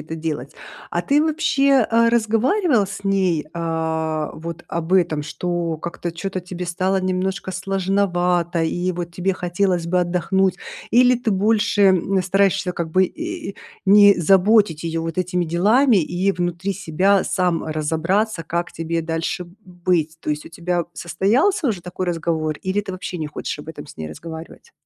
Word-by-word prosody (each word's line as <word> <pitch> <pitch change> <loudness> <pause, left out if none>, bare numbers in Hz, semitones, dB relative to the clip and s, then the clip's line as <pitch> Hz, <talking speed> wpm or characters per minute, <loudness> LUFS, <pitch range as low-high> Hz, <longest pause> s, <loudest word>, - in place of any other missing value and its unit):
это 160 +2 -7
делать. 155 -4 -4 0.4
А 175 - -1
ты 285 +9 +3
вообще, 280 -5 +2
э, 230 0 +4
разговаривал 235 - +2
с 200 0 -8
ней, 190 -5 +1
э, 160 -2 -2
вот 170 +1 -8
об 170 +1 -3
этом, 170 -5 +2
что 170 +1 -3
как-то 170 +1 -5
чё-то 185 +2 -4
тебе 180 0 -6
стало 185 +2 0
немножко 185 +1 -2
сложновато 180 -3 0
и 175 +3 -1
вот 170 -1 -5
тебе 185 +2 -1
хотелось 180 -1 0
бы 180 +1 +2
отдохнуть, 185 +2 +1 0.3
или 250 +1 +5
ты 235 -2 -2
больше, 205 +1 +2
м, 190 0 +3
стараешься 190 0 +1
как 170 -2 -4
бы, 185 +3 +4
э, 330 - -5 0.3
не 205 0 +7
заботить 195 -1 +4
её 165 0 -2
вот 165 +2 -4
этими 180 0 0
делами 210 - +3
и 180 +5 0
внутри 175 +2 -2
себя 190 +2 +2
сам 180 -3 0
разобраться, 165 +6 0
как 170 +2 -3
тебе 165 0 -2
дальше 165 +2 -2
б 175 - -17 0.3
быть. 165 -3 +1
То - - -3
есть 150 0 -3
у - - -8
тебя 175 0 -2
состоялся 270 - +1
уже 195 -6 -2
такой 180 +1 -5
разговор, 160 -2 -1
или 190 +2 0
ты 195 -2 -7
вообще 185 -1 -5
не 155 - -3
хочешь 150 0 -5
об 150 - -10
этом 150 -2 -8
с - - -13
ней 80 -1 -5
разговаривать? 165 - -10
180 Hz, 165 wpm, -21 LUFS, 165-195 Hz, 0.4 s, не